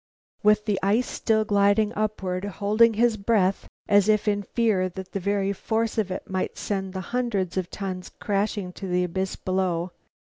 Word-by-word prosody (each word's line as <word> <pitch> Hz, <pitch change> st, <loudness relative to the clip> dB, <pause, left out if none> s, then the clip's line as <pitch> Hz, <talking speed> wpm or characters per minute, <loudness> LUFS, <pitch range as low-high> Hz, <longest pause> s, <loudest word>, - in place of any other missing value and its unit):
With 210 Hz, 0 st, +4 dB
the 205 Hz, -3 st, 0 dB
ice 210 Hz, +6 st, +2 dB
still 220 Hz, -1 st, +1 dB
gliding 205 Hz, +1 st, +3 dB
upward, 200 Hz, -4 st, -2 dB
holding 210 Hz, +3 st, +3 dB
his 230 Hz, 0 st, +3 dB
breath, 195 Hz, -2 st, +1 dB, 0.2 s
as 205 Hz, 0 st, +4 dB
if 215 Hz, 0 st, +2 dB
in 205 Hz, -1 st, +2 dB
fear 205 Hz, -4 st, +1 dB
that 185 Hz, +1 st, -8 dB
the 195 Hz, -, -2 dB
very 200 Hz, +1 st, 0 dB
force 225 Hz, +3 st, -1 dB
of 205 Hz, -3 st, 0 dB
it 185 Hz, -, -5 dB
might 190 Hz, -1 st, -3 dB
send 190 Hz, -2 st, -3 dB
the 190 Hz, -, -3 dB
hundreds 210 Hz, -8 st, -1 dB
of 185 Hz, -2 st, -2 dB
tons 185 Hz, -2 st, -5 dB
crashing 200 Hz, -2 st, -2 dB
to 195 Hz, -, -7 dB
the 180 Hz, 0 st, +1 dB
abyss 190 Hz, +2 st, -2 dB
below. 185 Hz, -2 st, -1 dB
200 Hz, 175 wpm, -25 LUFS, 185-215 Hz, 0.2 s, With